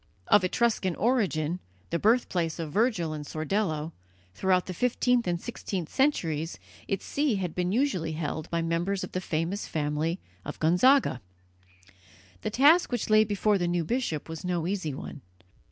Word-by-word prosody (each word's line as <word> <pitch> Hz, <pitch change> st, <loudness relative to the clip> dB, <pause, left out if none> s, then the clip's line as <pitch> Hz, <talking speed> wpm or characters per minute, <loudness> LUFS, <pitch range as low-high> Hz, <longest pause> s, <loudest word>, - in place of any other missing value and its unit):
Of 205 Hz, -, +6 dB
Etruscan 190 Hz, -2 st, +1 dB
origin, 205 Hz, -9 st, +1 dB
and 175 Hz, +4 st, -3 dB, 0.3 s
the 170 Hz, -, 0 dB
birthplace 190 Hz, -7 st, +1 dB
of 160 Hz, -3 st, -4 dB
Virgil 195 Hz, -, +1 dB
and 150 Hz, -1 st, -5 dB
Sordello, 155 Hz, 0 st, -2 dB, 0.4 s
throughout 185 Hz, -, +2 dB
the 185 Hz, -, -5 dB
fifteenth 245 Hz, +2 st, +1 dB
and 175 Hz, -1 st, 0 dB
sixteenth 190 Hz, -6 st, -5 dB
centuries 165 Hz, -, 0 dB, 0.3 s
its 195 Hz, -1 st, -2 dB
see 285 Hz, -5 st, +1 dB
had 180 Hz, -4 st, -3 dB
been 180 Hz, 0 st, -1 dB
usually 195 Hz, -, 0 dB
held 155 Hz, 0 st, -4 dB
by 170 Hz, -1 st, -1 dB
members 175 Hz, +4 st, -1 dB
of -, -, -6 dB
the 185 Hz, -, -2 dB
famous 170 Hz, +4 st, -2 dB
family 155 Hz, +3 st, -1 dB, 0.2 s
of -, -, -6 dB
Gonzaga. 180 Hz, -, +4 dB, 1.2 s
The -, -, -2 dB
task 290 Hz, +10 st, +5 dB
which 245 Hz, -3 st, -2 dB
lay 215 Hz, 0 st, +7 dB
before 210 Hz, -1 st, +1 dB
the 175 Hz, -, 0 dB
new 175 Hz, -1 st, 0 dB
bishop 235 Hz, -, -2 dB
was 160 Hz, -1 st, -7 dB
no 175 Hz, -2 st, -1 dB
easy 180 Hz, -7 st, -2 dB
one. 140 Hz, -, -8 dB
180 Hz, 160 wpm, -28 LUFS, 160-215 Hz, 1.2 s, lay